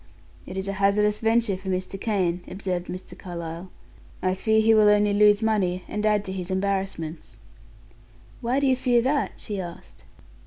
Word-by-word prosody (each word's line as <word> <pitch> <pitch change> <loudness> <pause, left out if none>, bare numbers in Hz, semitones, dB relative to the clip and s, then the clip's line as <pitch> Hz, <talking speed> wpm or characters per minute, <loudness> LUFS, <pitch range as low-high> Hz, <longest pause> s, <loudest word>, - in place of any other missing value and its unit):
"It 190 - -7
is 190 +1 -3
a 195 - -2
hazardous 210 +1 +3
venture 225 -2 +2
for 190 +1 -7
Mr. 185 +1 -3
Kane," 185 -5 0
observed 185 -2 -3
Mr. 185 +1 -8
Carlyle. 170 0 -7 0.5
"I 185 0 +2
fear 220 +3 +2
he 220 +1 +5
will 215 -1 +6
only 210 0 +4
lose 210 +1 +5
money, 185 -5 +1
and 210 - -3
add 210 -1 +2
to 190 - -4
his 185 -1 -5
embarrassments." 190 - -3 1.0
"Why 245 +4 +1
do 280 - +1
you 260 -1 +4
fear 245 -2 +2
that?" 280 +2 0
she 205 -3 -5
asked. 170 - -10
195 Hz, 170 wpm, -25 LUFS, 185-215 Hz, 1.0 s, will